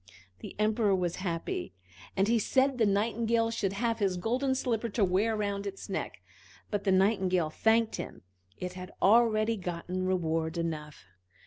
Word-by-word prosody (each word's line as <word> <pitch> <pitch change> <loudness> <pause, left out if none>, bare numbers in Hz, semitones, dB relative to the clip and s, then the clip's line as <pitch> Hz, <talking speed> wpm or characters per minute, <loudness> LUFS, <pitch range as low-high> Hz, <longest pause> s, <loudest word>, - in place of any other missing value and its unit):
The - - -9
Emperor 215 -1 +2
was 175 -2 -1
happy, 165 - -3 0.4
and 195 +1 +3
he 230 +1 +3
said 260 +3 +2
the 220 - +4
Nightingale 225 +3 +1
should 195 -4 -1
have 230 +2 -1
his 195 -3 +1
golden 255 +8 0
slipper 235 -3 -1
to 205 -1 +2
wear 200 +5 +1
round 200 -1 -2
its 195 0 -7
neck. 190 - -4 0.5
But 205 -1 -2
the 195 - +3
Nightingale 185 -4 +2
thanked 225 +4 +2
him, - - -7 0.3
it 180 0 -5
had 185 +1 -8
already 220 +1 +4
got 175 -3 -5
reward 175 -3 -1
enough. 155 -3 -4
200 Hz, 155 wpm, -30 LUFS, 180-225 Hz, 0.5 s, the